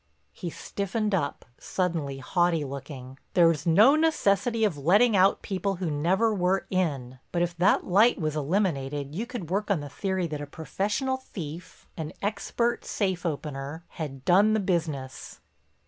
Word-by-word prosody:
He 170 - -5
stiffened 205 +5 -3
up, 155 -7 -1
suddenly 165 -7 -2
haughty 170 +3 +1
looking. 135 -1 -8 0.2
"There's 165 -3 +4
no 215 - +6
necessity 240 -8 +2
of 205 -7 +2
letting 200 - +4
out 190 +1 +4
people 195 0 -2
who 175 -3 -3
never 190 +10 +2
were 190 -1 +1
in. 140 -9 -1
But 175 -1 +1
if 175 -1 -2
that 185 +4 +3
light 210 +6 +4
was 155 -2 -1
eliminated 145 -4 -1
you 220 +8 -3
could 235 -10 -6
work 205 +3 -1
on 200 -5 +2
the 145 -1 -7
theory 190 +5 -2
that 150 -3 -4
a 145 - -6
professional 205 - -2
thief—an 165 - -8
expert 220 +3 -1
safe 185 -4 -1
opener—had 145 -1 -6
done 200 +5 +5
the - - +2
business." 160 -9 -3
175 Hz, 145 wpm, -27 LUFS, 150-200 Hz, 0.2 s, no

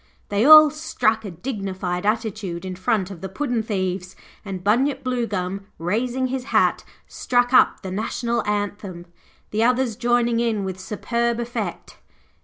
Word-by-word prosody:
They 205 +1 +1
all 310 0 +10
struck 225 -8 0
a - - -4
dignified 190 -2 -4
attitude 210 -5 -2
in 185 -1 -5
front 190 +1 -1
of 175 -4 -10
the 190 - -5
puddin' 245 +2 -1
thieves, 185 -3 -3 0.3
and 190 -3 -6
Bunyip 250 +8 +1
Bluegum, 200 -6 -2
raising 240 +9 -1
his 260 -1 -3
hat, - - +2 0.2
struck 245 0 0
up 255 - +4
the 190 - -5
National 235 +3 -2
Anthem, 205 -4 -3 0.5
the 215 +2 +1
others 250 -1 +2
joining 240 0 +1
in 225 -4 0
with 190 -1 -5
superb 235 +4 -2
effect. 240 0 -5
215 Hz, 145 wpm, -22 LUFS, 190-240 Hz, 0.5 s, all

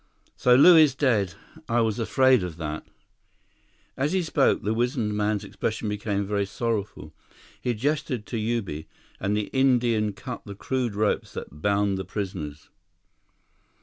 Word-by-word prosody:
"So 125 0 +4
Lew 170 +7 +8
is 155 -5 +6
dead. 110 -11 +1 0.3
I 120 0 +3
was 110 0 0
afraid 130 +1 +4
of 90 -3 -5
that." 80 -1 -5 1.1
As 140 +6 0
he 190 -1 +1
spoke, 155 -4 +2
the 105 - 0
wizened 120 -2 0
man's 105 0 0
expression 110 -1 -3
became 105 -1 -2
very 100 0 -1
sorrowful. 110 -1 -3 0.5
He 120 -1 -1
gestured 130 -2 -1
to 120 - -4
Ubi, 105 -9 -2 0.3
and 100 +2 0
the 105 - -3
Indian 120 -5 +2
cut 115 +5 -7
the 100 -2 -9
crude 125 0 -2
ropes 105 0 0
that 75 +2 -8
bound 100 0 +1
the - - -3
prisoners. 90 -6 -6
110 Hz, 150 wpm, -25 LUFS, 100-125 Hz, 1.1 s, Lew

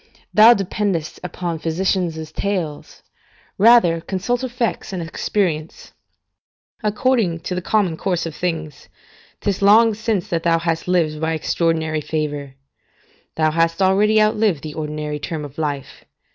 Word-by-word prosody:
Thou 225 +3 +8
dependest 195 -4 -2
upon 175 -2 -4
physicians' 165 -1 -1
tales: 180 -7 -4 0.6
rather 205 -7 +5
consult 200 +8 -2
effects 240 -4 -2
and 185 - -4
experience. 165 -2 -3 0.9
According 210 -5 +1
to 180 - -4
the 180 - -2
common 190 -4 +1
course 180 -2 -1
of 165 - -5
things, 160 -4 -4 0.5
'tis 200 -1 -1
long 220 +3 +6
since 215 -3 -2
that 165 -1 -1
thou 165 0 +2
hast 165 0 -2
lived 160 -4 +1
by 160 0 0
extraordinary 160 -1 0
favour; 145 -3 -4 0.8
thou 155 -1 +2
hast 165 +2 +1
already 200 +3 +4
outlived 215 -6 +2
the 155 -1 -6
ordinary 150 -1 -4
term 150 +1 -4
of 145 +2 -11
life. 145 -3 -4
170 Hz, 130 wpm, -20 LUFS, 160-200 Hz, 0.9 s, Thou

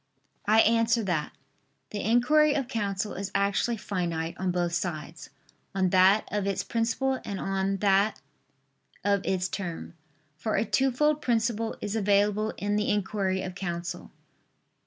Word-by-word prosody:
I 220 +1 +6
answer 230 +1 +3
that, 170 -6 -1 0.6
The 205 - -3
inquiry 290 +7 +4
of 270 -4 -1
counsel 205 -4 -2
is 195 +1 -4
actually 200 +4 +1
finite 170 -5 -3
on 190 0 -1
both 175 -1 0
sides, 160 -3 -4 0.5
on 190 -2 +1
that 190 +3 +5
of 205 -1 -1
its 195 - -1
principle 235 +3 -1
and 200 -2 -5
on 195 0 -1
that 200 +1 +3 0.8
of 200 0 +2
its 185 -1 0
term. 180 -4 -5 0.5
For 220 +5 -1
a - - +1
twofold 285 +5 +2
principle 230 -1 0
is 205 +1 -3
available 205 +1 +2
in 205 +1 -1
the 210 - 0
inquiry 195 -2 0
of 185 - -5
counsel. 175 -2 -5
200 Hz, 140 wpm, -27 LUFS, 185-225 Hz, 0.8 s, I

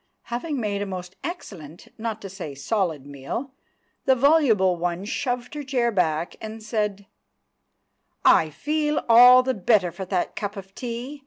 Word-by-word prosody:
Having 285 +3 -2
made 205 -3 -2
a 205 - -2
most 185 -1 -7
excellent, 180 - -8
not 220 -1 -5
to - - -5
say 180 -7 -7
solid, 160 -1 -1
meal, 145 - -6 0.5
the 265 - +5
voluble 245 - +4
one 175 +2 -2
shoved 245 +2 -3
her 295 - -4
chair 255 -4 0
back 170 -4 0
and 220 0 -7
said— 210 -3 -2 1.2
"I 160 - +6
feel 300 - -1
all 245 +2 +8
the 260 0 0
better 195 -3 +2
for 190 +3 -7
that 185 -1 -2
cup 205 0 -4
of 195 0 -10
tea. 245 +5 -6
210 Hz, 155 wpm, -24 LUFS, 180-250 Hz, 1.2 s, all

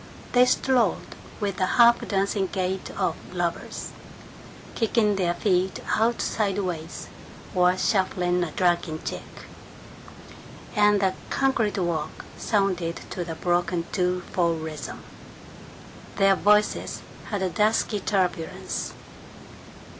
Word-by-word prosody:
They 250 0 +6
strolled 250 -6 +1 0.3
with 200 -3 -2
the 185 - +1
half 235 0 +6
dancing 195 -1 0
gait 185 0 -2
of - - +1 0.2
lovers, - - -3 0.8
kicking 220 -2 +2
their 175 -3 0
feet 185 -1 +1 0.2
out 230 +2 +1
sideways 185 -6 -2 0.5
or 180 -1 +3
shuffling 180 -3 +1
a 170 - -2
dragging 175 -2 +1
jig, - - -4 1.5
and 210 -1 +5
the 190 -1 +2 0.2
concrete 265 -7 +1
walk 170 -5 -2
sounded 185 -6 0 0.2
to 180 - -3
the 165 -1 -5
broken 175 0 0
two 180 -1 0
four 170 -2 +2
rhythm. 160 -2 -6 1.1
Their 195 -1 +5
voices 210 +2 +2 0.3
had 205 -3 -1
a 185 - +1
dusky 210 +1 +1
turbulence. 185 -5 -2
190 Hz, 110 wpm, -25 LUFS, 175-210 Hz, 1.5 s, They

